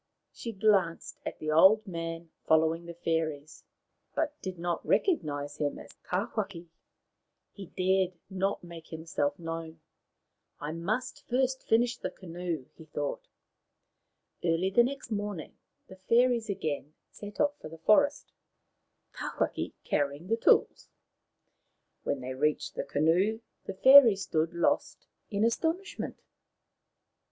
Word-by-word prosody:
She 230 - -6
glanced 195 -5 +1
at - - -5
the 155 0 -3
old 190 +8 +6
man 165 -2 -5 0.2
following 160 +2 +3
the 170 - -8
fairies, 160 -3 -2 0.5
but 310 -2 0
did 185 -1 -5
not 170 0 -2
recognize 145 - 0
him 145 -1 -1
as - - -11 0.2
Tawhaki. 195 -2 -3 0.8
He 195 -3 -9
dared 185 0 +1
not 190 0 -1
make 170 -2 -10
himself 160 -3 -2
known. 165 -1 -6 0.4
" - - -51
I 150 +1 -4
must 215 +10 -3
first 260 +1 +1
finish 240 +2 +2
the - - -4
canoe," 170 -5 -5
he 160 - -14
thought. 145 -2 -4 1.2
Early 175 +2 +1
the 240 - +6
next 265 -1 -4
morning 205 -5 -4 0.3
the 190 - -12
fairies 235 +3 +2
again 155 -5 -3 0.2
set 205 0 -10
off 290 0 +1
for - - -8
the 165 - -10
forest, 285 - +3 0.8
Tawhaki - - -2
carrying 145 +5 -1
the 225 - +3
tools. - - +3 1.1
When 140 - -2
they 130 +1 -4
reached 150 +3 0
the - - -3
canoe 180 +9 +2 0.2
the 195 - -5
fairies 240 -4 +8
stood 160 +1 -1
lost 170 - 0 0.2
in 205 +1 +1
astonishment. 330 +11 -2
180 Hz, 125 wpm, -30 LUFS, 160-220 Hz, 1.2 s, fairies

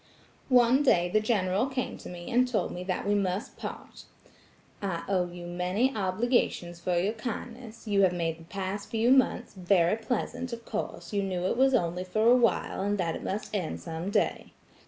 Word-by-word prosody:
"One 250 +1 +5
day 175 -11 +3
the 215 - +3
General 210 0 +1
came 260 -2 -3
to - - -9
me 175 -1 -8
and 250 +1 +4
told 250 -3 -1
me 180 - -5
that 185 -1 -2
we 205 - +3
must 195 0 -1
part. - - -8 0.8
'I 180 -4 -2
owe 185 -3 +1
you 175 0 -9
many 180 +9 0
obligations 190 -3 0
for 175 0 0
your 195 +5 +1
kindness. 230 0 -7
You 200 -1 +3
have 190 -2 +5
made 165 -2 -2
the - - -12
past 195 +2 -4
few 230 +2 +2
months 265 -1 +3
very 180 -1 +3
pleasant; 245 +2 -3
of 230 0 -7
course 220 0 -5
you 200 - +1
knew 185 -2 -2
it 185 - +1
was 265 +1 +4
only 175 -4 0
for 215 +4 0
awhile, 235 -6 +2
and 205 +1 0
that 170 -4 -1
it - - -7
must 205 +3 -4
end 180 -6 -2
some 165 +2 -5
day. - - 0
200 Hz, 190 wpm, -28 LUFS, 180-235 Hz, 0.8 s, One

